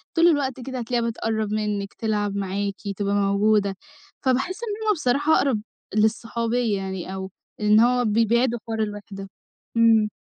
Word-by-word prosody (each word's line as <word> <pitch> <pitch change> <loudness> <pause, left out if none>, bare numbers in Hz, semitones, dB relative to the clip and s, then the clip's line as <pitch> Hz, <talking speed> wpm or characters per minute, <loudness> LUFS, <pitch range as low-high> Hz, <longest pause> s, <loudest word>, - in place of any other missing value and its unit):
طول 335 +1 +5
الوقت 275 -5 +1
كده 260 +1 -5
هتلاقيها 235 0 -1
بتقرّب 220 -2 -2
منِّك، 210 -2 -2
تلعب 210 -2 -1
معاكِ، 200 0 -2 0.2
تبقى 200 -1 0
موجودة، 200 0 +2 0.5
فباحس 265 +8 +1
إن 435 -1 -4
همَّ 420 - +5
بصراحة 290 0 +2
أقرَب 255 -7 +1 0.3
للصحوبية 225 0 +1
يعني 190 -1 -5
أو 190 -1 -5 0.3
إن 210 0 +5
هو 245 +1 +3
بيبعدوا 230 +2 +2
حوار 225 -1 -3
الوِحدة. 205 -2 -7 0.5
إمم. 225 -2 +5
220 Hz, 140 wpm, -24 LUFS, 205-245 Hz, 0.5 s, طول